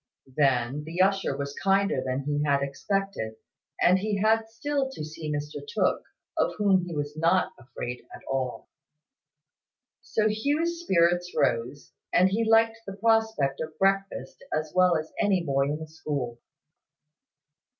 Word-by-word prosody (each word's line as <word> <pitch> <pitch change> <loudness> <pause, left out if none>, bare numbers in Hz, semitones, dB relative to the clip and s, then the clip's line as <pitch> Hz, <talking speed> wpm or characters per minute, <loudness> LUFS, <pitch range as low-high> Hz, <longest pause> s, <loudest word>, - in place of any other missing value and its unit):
Then, 135 0 +2
the 165 +3 -6
usher 195 +1 +2
was 140 0 -4
kinder 195 -7 +2
than 130 +1 -1
he 145 +1 -1
had 140 -1 +2
expected; 140 - -2 0.4
and 185 +2 +5
he 210 +1 -1
had 220 +2 +3
still 270 +4 -1
to 155 -13 -6
see 155 0 -6
Mr 150 0 -3
Tooke, 455 +2 0 0.3
of - - +1
whom 195 -4 +3
he 170 - -5
was 145 0 -3
not 170 +4 +2
afraid 120 0 -6
at - - -11
all. 130 -2 -2 1.3
So 215 -1 +1
Hugh's 295 +10 0
spirits 175 - +2
rose, 125 +5 0 0.2
and 185 +1 +5
he 215 +4 +1
liked 225 0 +4
the 195 - -5
prospect 220 -11 +2
of 155 0 -6
breakfast 195 -7 0
as 155 0 -2
well 180 -2 +5
as 155 0 -6
any 195 -4 +2
boy 135 -3 +1
in 145 +2 -1
the 160 0 -8
school. 145 -6 -4
170 Hz, 150 wpm, -27 LUFS, 145-205 Hz, 1.3 s, and